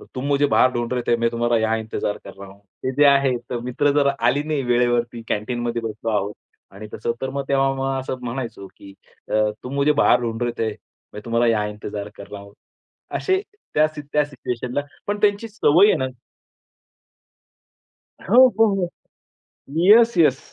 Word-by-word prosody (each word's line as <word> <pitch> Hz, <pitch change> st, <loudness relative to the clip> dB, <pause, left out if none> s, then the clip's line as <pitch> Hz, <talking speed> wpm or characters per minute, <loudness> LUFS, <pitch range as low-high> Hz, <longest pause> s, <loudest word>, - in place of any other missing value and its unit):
तुम 130 Hz, +1 st, -4 dB
मुझे 145 Hz, 0 st, +2 dB
बाहर 130 Hz, -2 st, +4 dB
ढूंढ 120 Hz, 0 st, -2 dB
रहे 125 Hz, -, -1 dB
थे, 120 Hz, -, +4 dB
मैं 115 Hz, 0 st, +1 dB
तुम्हाला 120 Hz, 0 st, 0 dB
यहाँ 110 Hz, 0 st, +1 dB
इंतजार 110 Hz, -2 st, -3 dB
कर 100 Hz, -, -10 dB
रहा 100 Hz, 0 st, -11 dB
हूँ. 100 Hz, -, -17 dB, 0.2 s
ते 130 Hz, -, -1 dB
जे 145 Hz, +1 st, +5 dB
आहे 140 Hz, -2 st, +4 dB
तर 120 Hz, -, -3 dB
मित्र 125 Hz, +4 st, +1 dB
जर 145 Hz, -1 st, +3 dB
आली 125 Hz, +5 st, +2 dB
नाही 150 Hz, -2 st, -1 dB
वेळेवरती 120 Hz, -1 st, +1 dB
कँटीनमध्ये 120 Hz, +2 st, -2 dB
बसलो 110 Hz, 0 st, -4 dB
आहोत 105 Hz, 0 st, -1 dB, 0.4 s
आणि 105 Hz, +2 st, -10 dB
तसं 120 Hz, -, -2 dB
तर 130 Hz, -, -2 dB
मग 140 Hz, +1 st, -3 dB
तेव्हा 135 Hz, 0 st, +2 dB
मला 135 Hz, 0 st, -2 dB
असं 130 Hz, 0 st, -4 dB
म्हणायचो 120 Hz, -5 st, -5 dB
की 100 Hz, 0 st, -13 dB, 0.4 s
अ, -, -, -4 dB, 0.3 s
तुम 125 Hz, -, -6 dB
मुझे 140 Hz, +1 st, +3 dB
बाहर -, -, +5 dB
ढूंढ 115 Hz, -1 st, -3 dB
रहे 120 Hz, -, 0 dB
थे, 110 Hz, -1 st, 0 dB, 0.4 s
मैं 105 Hz, -, -7 dB
तुम्हाला 115 Hz, 0 st, +1 dB
या 110 Hz, -2 st, +2 dB
इंतजार 105 Hz, 0 st, -6 dB
कर 100 Hz, -, -11 dB
रहा 100 Hz, -, -7 dB
हूँ. 100 Hz, 0 st, -15 dB, 0.6 s
असे 380 Hz, 0 st, 0 dB, 0.3 s
त्या 155 Hz, +1 st, +4 dB
सी 155 Hz, -1 st, -9 dB
त्या 150 Hz, -, +4 dB
सिच्युएशनला 125 Hz, -1 st, -4 dB, 0.3 s
पण 205 Hz, 0 st, -1 dB
त्यांची 205 Hz, +1 st, +2 dB
सवय 200 Hz, -3 st, +4 dB
आहे -, -, +4 dB
ना 130 Hz, -, -1 dB, 2.1 s
हो, 200 Hz, -, -1 dB, 0.2 s
हो, 225 Hz, -, +7 dB
हो. 180 Hz, -3 st, -1 dB, 0.9 s
Yes, 225 Hz, +7 st, +6 dB
yes. 145 Hz, -6 st, +4 dB
125 Hz, 185 wpm, -22 LUFS, 115-145 Hz, 2.1 s, हो